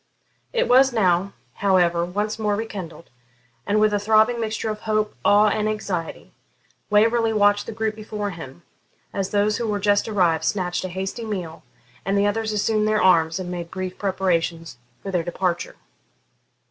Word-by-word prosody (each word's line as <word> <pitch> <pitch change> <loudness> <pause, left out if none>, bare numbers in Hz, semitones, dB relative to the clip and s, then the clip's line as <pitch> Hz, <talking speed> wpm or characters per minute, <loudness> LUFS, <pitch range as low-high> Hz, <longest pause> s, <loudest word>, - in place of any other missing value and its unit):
It 485 -1 +1
was 265 +2 +5
now, 195 -3 +1 0.2
however, 175 -3 +2
once 205 +5 -3
more 210 -1 0
rekindled, 190 -8 -7 0.6
and 210 +1 +2
with 215 0 +3
a 205 - +2
throbbing 220 +3 +3
mixture 220 0 -2
of 210 - -6
hope, 215 -1 -1
awe, 210 +1 +5
and 215 +1 0
anxiety, 190 -6 -4 0.6
Waverley 225 +2 +3
watched 205 -1 +2
the - - -4
group 220 0 -2
before 210 -1 -5
him, 165 -2 -10 0.5
as 195 -1 -2
those 210 +1 +1
who 235 - -2
were 205 -1 -1
just 205 +1 +2
arrived 180 -7 +1
snatched 180 -3 -1
a 185 - -4
hasty 190 +5 -4
meal, 180 -7 -5 0.4
and 195 +1 0
the 200 - +3
others 220 +1 0
assumed 215 0 +1
their 215 0 +2
arms 165 -3 +3
and 180 -1 -5
made 170 -1 -5
brief 185 0 -6
preparations 170 -7 -1 0.2
for 195 - -5
their 180 -2 +1
departure. 175 +1 -2
205 Hz, 165 wpm, -23 LUFS, 180-215 Hz, 0.6 s, was